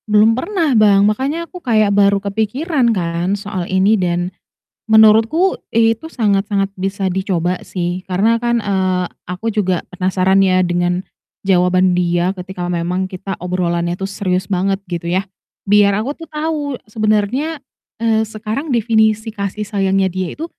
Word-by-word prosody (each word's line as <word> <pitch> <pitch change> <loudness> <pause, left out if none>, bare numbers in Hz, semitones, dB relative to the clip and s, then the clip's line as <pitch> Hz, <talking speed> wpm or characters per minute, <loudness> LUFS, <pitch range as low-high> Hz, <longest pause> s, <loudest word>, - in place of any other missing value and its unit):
Belum 215 +2 +5
pernah, 320 - 0
Bang, 205 -3 +5
makanya 270 +10 0
aku 360 +1 -11
kayak 215 -7 +2
baru 200 0 +4
kepikiran 235 - 0
kan 175 -1 -1
soal 195 -3 -5
ini, 190 +3 +3
dan 175 +1 -1 0.6
menurutku 225 - +5 0.2
itu 230 +7 +1
sangat-sangat 200 -3 +1
bisa 195 +1 -2
dicoba 185 -1 -1
sih. 180 0 -4
Karena 200 +5 +2
kan, 235 0 0
eee, 185 -3 0 0.2
aku 180 +6 -4
juga 190 -5 0
penasaran 185 +1 +2
ya, 185 -1 +3
dengan 175 0 0 0.4
jawaban 185 -1 +2
dia 175 +1 0
ketika 180 -1 -6
memang 180 +2 -1
kita 190 +1 -6
obrolannya 175 -1 -1
tuh 195 - -5
serius 185 -2 -1
banget 195 +1 0
gitu 170 -2 -5
ya, 185 +3 0 0.4
biar 200 0 +4
aku 225 +7 -2
tuh 330 - -9
tau 300 -3 -3
sebenarnya, 215 +8 0 0.4
eee, 220 -1 +1
sekarang 220 +7 -4
definisi 220 -2 +1
kasih 200 0 -4
sayangnya 195 -2 0
dia 185 -1 -4
itu 315 - -5
200 Hz, 145 wpm, -17 LUFS, 185-220 Hz, 0.6 s, Belum